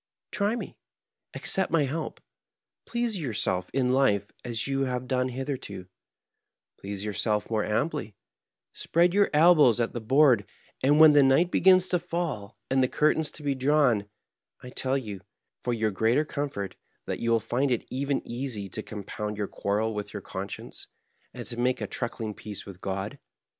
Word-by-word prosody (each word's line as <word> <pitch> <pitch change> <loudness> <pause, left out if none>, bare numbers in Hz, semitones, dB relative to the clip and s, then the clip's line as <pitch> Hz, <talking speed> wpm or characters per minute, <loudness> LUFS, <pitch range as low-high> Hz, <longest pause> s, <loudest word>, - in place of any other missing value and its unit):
Try 210 +2 +1
me. - - -7 0.6
Accept 190 -1 0
my 165 -3 +3
help. 155 +4 -3 0.7
Please 235 -4 -1
yourself 105 - -1
in 130 -2 +1
life 105 -7 +2
as 120 -2 -4
y<m 135 0 0
have 125 0 -3
done 130 -1 0
hith 130 +1 -5
erto; 100 -9 -5 0.9
please 100 +1 -5
yom^elf 105 +1 -1
more 110 -2 +1
amply, 110 - -1 0.6
spread 170 +1 +2
your 205 +1 +4
elbows 150 -7 +6
at 115 - 0
the 120 - -4
board; 130 -2 +4 0.4
and 145 +3 +4
when 155 -1 +9
the 145 - +7
night 135 +7 +4
begins 185 0 +5
to 180 - +2
fall 165 - -4
and 135 0 +2
the 130 - +3
curtains 155 +3 +2
to 150 - -10
be 140 -1 +1
drawn, 130 -6 +2 0.6
I 125 - -9
tell 130 +1 0
you, 105 -8 -6 0.4
for 125 - 0
your 110 -2 0
greater 115 +9 +2
com 145 -1 -3
fort, 100 -7 -5 0.3
that - - -3
you 115 - -1
will 115 0 +4
find 130 +6 0
it 120 -3 0
even 140 +1 -1
easy 120 -5 -4
to 110 - -5
compound 105 0 -5
your 105 -1 -2
quarrel 105 +4 -1
with 105 0 -5
your 100 - -5
conscience, 95 +1 -7 0.4
and - - -8
to 120 - -6
make 125 +1 +1
a - - -2
truckling 115 -3 -4
peace 105 -1 -8
with 95 -2 -11
God. 95 +1 -4
125 Hz, 175 wpm, -27 LUFS, 105-145 Hz, 0.9 s, when